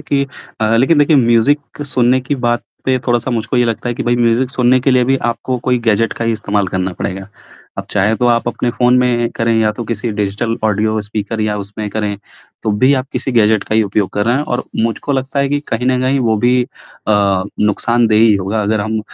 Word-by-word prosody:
कि 140 -1 0 0.4
अ, 110 +1 +2
लेकिन 140 +6 +3
देखिए 145 +1 +4
म्यूज़िक 135 +5 +1
सुनने 130 -1 +2
की 135 +3 -2
बात 120 0 +1 0.2
पे 130 -1 +1
थोड़ा-सा 120 +1 0
मुझको 120 +1 -2
ये 120 - +3
लगता 115 +1 -2
है 120 - -2
कि - - -4
भई 120 0 +1
म्यूज़िक 120 +2 +1
सुनने 130 -1 +3
के 135 - +1
लिए 125 -1 +3
भी 135 +2 +2
आपको 125 +2 -2
कोई 125 -1 +2
गैजेट 115 +1 +2
का 115 - -4
ही 115 - +1
इस्तेमाल 105 -2 -1
करना 95 0 -2
पड़ेगा। 95 +2 -5 0.5
अब - - -3
चाहे 105 +2 +2
तो 125 - +1
आप 115 0 0
अपने 120 0 -2
फ़ोन 125 +1 +2
में 120 -2 +1
करें 115 0 +1
या 110 -1 +2
तो 115 +2 -6
किसी 115 +1 -3
डिजिटल 105 +3 -1
ऑडियो 110 +1 +1
स्पीकर 105 +1 -4
या 105 -1 0
उसमें 105 +1 -5
करें 105 -1 -2 0.5
तो 110 - 0
भी 130 +2 +6
आप 130 0 -2
किसी 130 - -1
गैजेट 110 -3 +3
का - - -3
ही 110 - +4
उपयोग 100 -1 -1
कर 105 - 0
रहे 120 - +3
हैं 145 - 0
और 125 -4 -2 0.2
मुझको 115 +5 -2
लगता 135 +1 -2
है 140 0 +1
कि 145 0 0
कहीं 120 +2 -2
न 130 0 +2
कहीं 130 +1 +1
वो 110 -2 +1
भी 125 0 +4
अ, 100 -5 -1 0.2
नुकसानदेह 110 +1 +2
ही 110 -2 +5
होगा 100 +3 -1
अगर 110 +1 0
हम 110 +1 -2
115 Hz, 230 wpm, -16 LUFS, 105-125 Hz, 0.5 s, भी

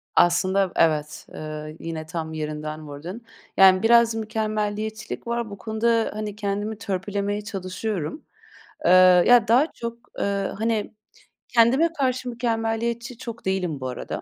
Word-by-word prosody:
Aslında, 185 +2 +3
v - - -19
evet. 155 -2 +1
Eee, 155 0 -7
yine 160 -1 -5
tam 160 -1 -5
yerinden 155 0 -5
vurdun. 170 +11 -8 0.4
Yani, 190 +1 +7
biraz 235 0 +5
mükemmeliyetçilik 215 0 -3
var. 235 -1 -2
Bu 200 - -8
konuda, 225 0 +1
hani, 210 -1 -5
kendimi 205 +1 -3
törpülemeye 200 0 -2
çalışıyorum. 190 - -4 0.6
Eee, - - +5 0.4
ya, 240 -2 +6
daha 250 +7 +5
çok, 235 0 -6 0.2
eee, 200 -1 -1
hani, 225 -2 -1 0.6
kendime 250 +8 +4
karşı 255 -1 0
mükemmeliyetçi 235 +1 -2
çok 235 -3 -8
değilim 185 -6 -1
bu 130 - -3
arada. 125 - -5
210 Hz, 130 wpm, -24 LUFS, 175-230 Hz, 0.6 s, Yani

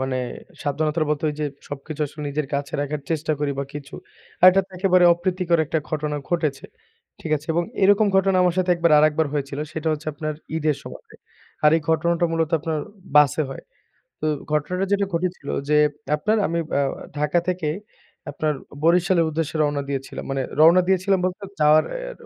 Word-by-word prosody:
মানে 130 -1 -1 0.5
সাবধানতার 155 +2 0
মতোই 150 0 0
যে - - 0 0.2
সবকিছু 145 +2 -7
আসলে 150 +2 -10
নিজের 145 +1 -2
কাছে 140 0 -3
রাখার 145 +1 -3
চেষ্টা 155 -1 0
করি 145 - 0
বা 140 - -1
কিছু। 145 -1 -8 0.5
আর - - +9
এটা 190 +1 +3 0.2
একেবারে 185 -1 +4
অপ্রীতিকর 175 -1 0
একটা 160 - 0
ঘটনা 150 -1 -2
ঘটেছে। 155 -6 -1 0.6
ঠিক 160 - -6
আছে? 150 +1 -12
এবং 170 +1 +1 0.2
এরকম 205 +2 +5
ঘটনা 190 0 +3
আমার 180 -2 +2
সাথে 185 -1 +1
একবার 170 -1 +2
আরেকবার 155 +1 +3
হয়েছিল 140 -1 -3
সেটা 160 0 -2
হচ্ছে 155 0 -6
আপনার 155 0 -4 0.2
ঈদের 155 -2 +1
সময়। - - -10 0.6
আর 150 - +7
এই - - -1
ঘটনাটা 170 +2 +2
মূলত 165 -1 0
আপনার 160 0 -2 0.4
বাসে 150 +1 +5
হয়। 135 - -8 0.6
তো - - -3 0.3
ঘটনাটা 180 +5 0
যেটা 200 0 +2
ঘটেছিল 175 -3 -2 0.2
যে 150 - +4 0.4
আপনার 215 +9 0
আমি 170 0 -1 0.2
আ - - +3 0.4
ঢাকা 150 +3 +2
থেকে 180 -4 -1 0.6
আপনার 155 -1 -1 0.3
বরিশালের 175 +1 +3
উদ্দেশ্যে 160 0 -3
রওনা 145 -1 0
দিয়েছিলাম। 135 -1 -4
মানে 135 - -1 0.2
রওনা 170 +4 +7
দিয়েছিলাম 190 +1 +2
বলতে 185 +2 -3 0.2
যাওয়ার 155 +1 +6
অ্যা - - -5
155 Hz, 170 wpm, -23 LUFS, 150-180 Hz, 0.6 s, আর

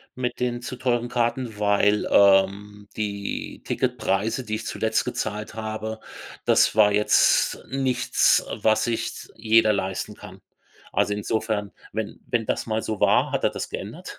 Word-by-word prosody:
mit 125 -1 -3
den 120 -1 -2
zu 125 - -6
teuren 120 -1 0
Karten, 120 -2 -1
weil, 105 0 +2
ähm, 100 +1 +3
die 100 -2 -4
Ticketpreise, 110 +6 -1
die 110 -1 -2
ich 110 +1 -6
zuletzt 110 0 -1
gezahlt 105 -4 -4
habe, 110 0 -5 0.5
das - - +4
war 105 -1 +5
jetzt 105 +1 +3
nichts, 130 -2 +2
äh, - - -4
was 110 0 +3
sich 115 -1 -1
s - - -11
jeder 110 0 +4
leisten 95 +1 -3
kann. 95 -2 -13 0.5
Also, 105 - +1
insofern, 105 0 -2 0.2
wenn 110 0 -4
wenn 115 -2 0
das - - -1
mal 110 -1 -1
so 110 -2 -4
war, - - +3
hat - - -1
er - - +3
das - - -5
geändert. - - -7
110 Hz, 155 wpm, -24 LUFS, 105-115 Hz, 0.5 s, war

